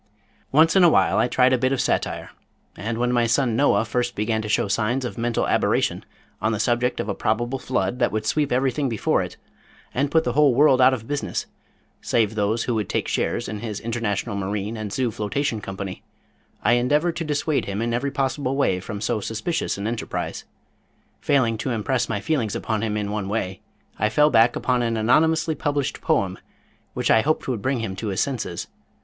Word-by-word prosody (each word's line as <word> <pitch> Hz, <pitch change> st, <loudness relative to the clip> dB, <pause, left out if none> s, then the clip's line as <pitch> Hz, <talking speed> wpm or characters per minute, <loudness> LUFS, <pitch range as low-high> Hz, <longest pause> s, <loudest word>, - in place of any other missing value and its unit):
Once 160 Hz, +5 st, +5 dB
in 190 Hz, -, +6 dB
awhile 170 Hz, -, +4 dB
I -, -, +3 dB
tried 130 Hz, +1 st, +3 dB
a 130 Hz, -, +2 dB
bit 130 Hz, +1 st, +1 dB
of 135 Hz, -, 0 dB
satire, -, -, -1 dB, 0.4 s
and 110 Hz, +4 st, -4 dB
when 125 Hz, +1 st, +1 dB
my 120 Hz, -1 st, +2 dB
son 120 Hz, -1 st, +2 dB
Noah 115 Hz, -5 st, +3 dB
first 120 Hz, +1 st, -1 dB
began 110 Hz, +1 st, 0 dB
to 110 Hz, -, -5 dB
show 105 Hz, -, +2 dB
signs 115 Hz, +6 st, 0 dB
of 120 Hz, -, -5 dB
mental 120 Hz, 0 st, -1 dB
aberration -, -, +1 dB, 0.4 s
on 110 Hz, -, +1 dB
the 105 Hz, -, -2 dB
subject 120 Hz, +3 st, +1 dB
of -, -, -2 dB
a -, -, -1 dB
probable 120 Hz, +4 st, -1 dB
flood 125 Hz, -1 st, -1 dB
that -, -, +2 dB
would 110 Hz, 0 st, -2 dB
sweep 145 Hz, +6 st, 0 dB
everything 130 Hz, +2 st, +1 dB
before 115 Hz, -3 st, +1 dB
it, -, -, -6 dB, 0.6 s
and 140 Hz, +3 st, 0 dB
put 160 Hz, +2 st, +3 dB
the 125 Hz, -, -1 dB
whole 145 Hz, -2 st, +4 dB
world 135 Hz, -2 st, +5 dB
out 130 Hz, +1 st, +6 dB
of 115 Hz, -2 st, -10 dB
business 145 Hz, 0 st, -2 dB, 0.6 s
save 110 Hz, -2 st, +1 dB
those 110 Hz, +2 st, 0 dB
who 120 Hz, -, -1 dB
would 105 Hz, -4 st, -2 dB
take -, -, -1 dB
shares -, -, -1 dB
in 105 Hz, -, -5 dB
his 105 Hz, -2 st, -5 dB
International 115 Hz, -2 st, -2 dB
Marine 100 Hz, +2 st, -3 dB
and 110 Hz, -2 st, -5 dB
Zoo 125 Hz, +1 st, 0 dB
Flotation 110 Hz, +3 st, -2 dB
Company, 95 Hz, -1 st, -6 dB, 0.6 s
I 120 Hz, -, +4 dB
endeavored 150 Hz, +7 st, +1 dB
to 165 Hz, -, -2 dB
dissuade 150 Hz, 0 st, 0 dB
him 100 Hz, +1 st, -3 dB
in 115 Hz, +1 st, -1 dB
every 130 Hz, +4 st, 0 dB
possible 135 Hz, 0 st, -1 dB
way 115 Hz, -10 st, +1 dB
from 100 Hz, +2 st, -6 dB
so 110 Hz, +1 st, 0 dB
suspicious 115 Hz, -, -2 dB
an 100 Hz, -, -4 dB
enterprise. 115 Hz, 0 st, -4 dB, 0.7 s
Failing 120 Hz, -6 st, +1 dB
to 130 Hz, -, -2 dB
impress 120 Hz, +1 st, -1 dB
my 100 Hz, -, -1 dB
feelings 115 Hz, -6 st, -1 dB
upon 110 Hz, -2 st, -2 dB
him 110 Hz, -1 st, -1 dB
in 105 Hz, -1 st, -2 dB
one 105 Hz, -2 st, -3 dB
way, 95 Hz, -3 st, -3 dB, 0.4 s
I 105 Hz, -, +2 dB
fell 150 Hz, +5 st, +4 dB
back 115 Hz, 0 st, +5 dB
upon 125 Hz, -1 st, 0 dB
an 115 Hz, -1 st, 0 dB
anonymously 160 Hz, +8 st, +3 dB
published 145 Hz, -1 st, -2 dB
poem, 95 Hz, -1 st, 0 dB, 0.6 s
which -, -, +1 dB
I 110 Hz, -, +6 dB
hoped 155 Hz, +5 st, 0 dB
would 125 Hz, -6 st, -2 dB
bring 130 Hz, 0 st, 0 dB
him 95 Hz, -4 st, -4 dB
to 110 Hz, -, -4 dB
his 95 Hz, -1 st, -2 dB
senses. 120 Hz, -11 st, -2 dB
120 Hz, 205 wpm, -23 LUFS, 105-135 Hz, 0.7 s, in